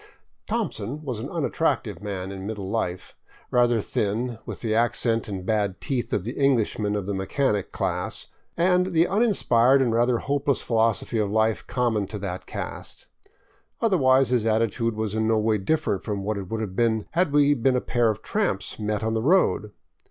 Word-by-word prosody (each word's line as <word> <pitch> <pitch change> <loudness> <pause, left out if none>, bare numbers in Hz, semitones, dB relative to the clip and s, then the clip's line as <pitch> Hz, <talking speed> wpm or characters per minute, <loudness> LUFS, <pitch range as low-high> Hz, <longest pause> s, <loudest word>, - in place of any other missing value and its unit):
"Thompson" 135 +10 -3
was 125 -7 -4
an 130 +6 -5
unattractive 140 - -1
man 95 -2 -4
in 95 0 -6
middle 105 -3 -5
life, 95 -4 -3 0.4
rather 120 -2 +3
thin, 110 +4 -2
with - - -6
the 110 -2 -1
accent 115 0 +2
and 95 -3 -5
bad 100 -3 0
teeth 130 -4 -2
of 95 - 0
the 115 - -4
Englishman 115 -6 +1
of 100 -2 -2
the 100 - -2
mechanic 100 +2 -1
class, - - -2 0.3
and 180 +1 +2
the 165 +1 +4
uninspired 140 - +3
and 125 -4 +2
rather 120 +1 +3
hopeless 140 +2 0
philosophy 115 0 +1
of 105 -2 0
life 110 +1 +1
com 125 -2 0
mon 105 -3 -1
to 105 - -6
that 95 -2 -5
caste. - - -7 0.7
Otherwise 135 - +3
his 125 -3 +2
attitude 115 +1 0
was 110 -1 -2
in 110 0 0
no 110 0 +3
way 110 0 +1
different 100 - 0
from 100 -3 -3
what 105 +2 -1
it 95 -2 -7
would 110 0 -2
have 95 -4 -5
been 110 -1 +1
had 170 -2 +1
we 145 0 +4
been 130 0 +2
a - - +3
pair 120 -2 +1
of 110 - -3
tramps - - -1
met 105 0 -2
on 110 0 0
the 110 - 0
road. 145 - +2
115 Hz, 185 wpm, -25 LUFS, 105-130 Hz, 0.7 s, the